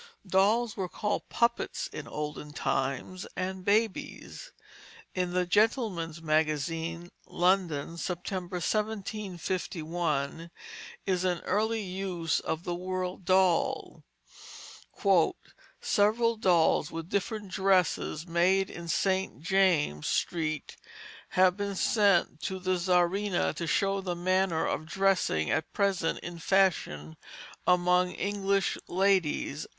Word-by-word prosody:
Dolls 210 Hz, +5 st, +2 dB
were 185 Hz, -2 st, -3 dB
called 210 Hz, +3 st, -3 dB
puppets 235 Hz, 0 st, 0 dB
in -, -, -6 dB
olden 150 Hz, 0 st, -5 dB
times, 135 Hz, +7 st, -2 dB
and 185 Hz, 0 st, -3 dB
babies. 220 Hz, -, -1 dB, 0.6 s
In 180 Hz, -1 st, -1 dB
the 180 Hz, 0 st, +1 dB
Gentleman's 180 Hz, -, +1 dB
Magazine, 160 Hz, +2 st, -1 dB, 0.2 s
London, 175 Hz, -4 st, +1 dB
September, 180 Hz, +1 st, -4 dB
1751, 175 Hz, -6 st, -2 dB, 0.6 s
is 185 Hz, -2 st, 0 dB
an 180 Hz, -2 st, 0 dB
early 220 Hz, +2 st, 0 dB
use 180 Hz, -4 st, -2 dB
of 160 Hz, +1 st, -3 dB
the 175 Hz, -, -3 dB
word 185 Hz, 0 st, -4 dB
doll, 185 Hz, -2 st, +2 dB, 1.8 s
"Several 230 Hz, +3 st, +2 dB
dolls 175 Hz, -8 st, +3 dB
with 165 Hz, 0 st, -6 dB
different 205 Hz, +1 st, -2 dB
dresses 185 Hz, -4 st, +1 dB
made 185 Hz, +3 st, +2 dB
in 170 Hz, -1 st, -8 dB
St. 190 Hz, -3 st, 0 dB
James 170 Hz, -, +2 dB
Street 155 Hz, -3 st, -2 dB, 0.6 s
have 185 Hz, -1 st, +5 dB
been 200 Hz, 0 st, -3 dB
sent 195 Hz, -6 st, +2 dB
to 190 Hz, -, -3 dB
the 185 Hz, 0 st, -1 dB
Czarina 180 Hz, +2 st, +1 dB
to 170 Hz, -, -4 dB
show 195 Hz, +4 st, +1 dB
the 180 Hz, -2 st, -3 dB
manner 185 Hz, -1 st, +1 dB
of 155 Hz, -, -2 dB
dressing 185 Hz, -, +1 dB
at 160 Hz, -, -1 dB
present 195 Hz, -5 st, +1 dB
in 175 Hz, -1 st, -7 dB
fashion 160 Hz, -, +1 dB, 0.5 s
among 180 Hz, 0 st, +3 dB
English 200 Hz, -1 st, 0 dB
ladies." 180 Hz, -6 st, +1 dB
180 Hz, 105 wpm, -29 LUFS, 165-195 Hz, 1.8 s, have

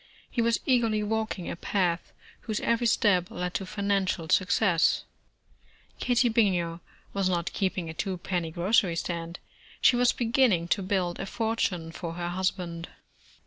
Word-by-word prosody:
He 240 Hz, -, 0 dB
was 230 Hz, 0 st, +2 dB
eagerly 230 Hz, -5 st, +2 dB
walking 220 Hz, -4 st, -2 dB
a -, -, -3 dB
path 175 Hz, -1 st, -1 dB, 0.4 s
whose 215 Hz, -2 st, -1 dB
every 235 Hz, +1 st, +1 dB
step 185 Hz, -5 st, +3 dB
led 180 Hz, 0 st, -4 dB
to 190 Hz, -, -3 dB
financial 195 Hz, -4 st, -1 dB
success. 190 Hz, -2 st, +3 dB, 1.0 s
Katie 245 Hz, 0 st, +2 dB
Bininger 180 Hz, -7 st, +1 dB, 0.3 s
was 195 Hz, -2 st, +1 dB
not 175 Hz, -2 st, -1 dB
keeping 185 Hz, -3 st, -1 dB
a 160 Hz, -, -5 dB
two 190 Hz, +3 st, -3 dB
penny 175 Hz, -2 st, -2 dB
grocery 180 Hz, +2 st, +2 dB
stand. 170 Hz, 0 st, -4 dB, 0.4 s
She -, -, +5 dB
was 245 Hz, 0 st, +4 dB
beginning 225 Hz, -8 st, +2 dB
to 200 Hz, -, +2 dB
build 185 Hz, -2 st, -1 dB
a 195 Hz, -, -4 dB
fortune 195 Hz, -7 st, -1 dB
for 165 Hz, 0 st, -6 dB
her 175 Hz, 0 st, -3 dB
husband. 175 Hz, -2 st, -2 dB
190 Hz, 145 wpm, -28 LUFS, 175-220 Hz, 1.0 s, She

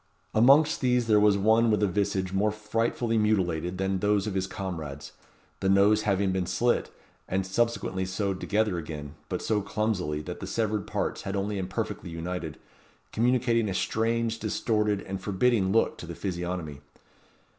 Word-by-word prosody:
Amongst 140 Hz, +8 st, +5 dB
these 125 Hz, -2 st, +2 dB
there 105 Hz, -2 st, +4 dB
was 105 Hz, -1 st, +4 dB
one 110 Hz, +3 st, +4 dB
with 105 Hz, -1 st, +2 dB
a -, -, +4 dB
visage 95 Hz, -1 st, -1 dB
more 100 Hz, +2 st, +2 dB
frightfully 115 Hz, +2 st, -1 dB
mutilated 90 Hz, -5 st, 0 dB
than 95 Hz, 0 st, 0 dB
those 105 Hz, 0 st, +2 dB
of 105 Hz, -, -3 dB
his 95 Hz, 0 st, -1 dB
comrades; 80 Hz, -8 st, -6 dB, 0.5 s
the 95 Hz, -, 0 dB
nose 100 Hz, +2 st, +5 dB
having 100 Hz, -2 st, +1 dB
been 95 Hz, -1 st, -1 dB
slit, 120 Hz, 0 st, +1 dB, 0.4 s
and 95 Hz, +1 st, 0 dB
subsequently 95 Hz, -2 st, 0 dB
sewed 95 Hz, 0 st, -2 dB
together 105 Hz, -4 st, 0 dB
again, 75 Hz, -3 st, -7 dB, 0.2 s
but -, -, -3 dB
so 105 Hz, -2 st, +1 dB
clumsily 95 Hz, -8 st, -2 dB
that -, -, -6 dB
the -, -, -6 dB
severed 110 Hz, -3 st, -1 dB
parts -, -, -2 dB
had 95 Hz, -, -4 dB
only 100 Hz, +1 st, -2 dB
imperfectly 95 Hz, -1 st, -4 dB
united, 85 Hz, -1 st, -5 dB, 0.5 s
communicating 115 Hz, -2 st, +2 dB
a 95 Hz, -, -3 dB
strange, 115 Hz, +1 st, 0 dB
distorted, 105 Hz, -2 st, 0 dB
and 95 Hz, 0 st, -5 dB
forbidding 100 Hz, 0 st, +2 dB
look 115 Hz, +2 st, +2 dB
to 85 Hz, -, -8 dB
the 85 Hz, -, -6 dB
physiognomy. 90 Hz, -6 st, -4 dB
100 Hz, 160 wpm, -27 LUFS, 95-110 Hz, 0.5 s, Amongst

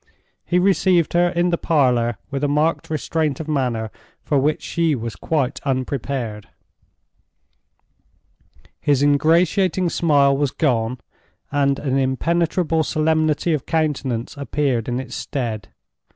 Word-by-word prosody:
He 180 Hz, -, 0 dB
received 180 Hz, -2 st, +3 dB
her 175 Hz, +1 st, +3 dB
in 175 Hz, 0 st, 0 dB
the 170 Hz, -, 0 dB
parlor 125 Hz, -7 st, +2 dB
with 140 Hz, 0 st, -3 dB
a -, -, +3 dB
marked 150 Hz, +3 st, 0 dB
restraint 155 Hz, 0 st, -1 dB
of 160 Hz, -, -6 dB
manner 125 Hz, -7 st, -1 dB, 0.3 s
for 145 Hz, -, +1 dB
which 150 Hz, +3 st, 0 dB
she 165 Hz, -3 st, 0 dB
was 115 Hz, -2 st, -5 dB
quite 145 Hz, -6 st, -1 dB
unprepared. 130 Hz, -5 st, -3 dB, 2.3 s
His 145 Hz, -2 st, +2 dB
ingratiating 170 Hz, +5 st, +2 dB
smile 140 Hz, -4 st, +3 dB
was 140 Hz, 0 st, +1 dB
gone, 125 Hz, -5 st, 0 dB, 0.5 s
and 140 Hz, -1 st, +2 dB
an 135 Hz, -1 st, -1 dB
impenetrable 165 Hz, +5 st, +1 dB
solemnity 155 Hz, +1 st, +1 dB
of 150 Hz, -, -3 dB
countenance 145 Hz, -7 st, -1 dB
appeared 140 Hz, -5 st, -1 dB
in 120 Hz, +1 st, -1 dB
its 130 Hz, -2 st, -7 dB
stead. 115 Hz, -6 st, -4 dB
145 Hz, 125 wpm, -21 LUFS, 130-160 Hz, 2.3 s, received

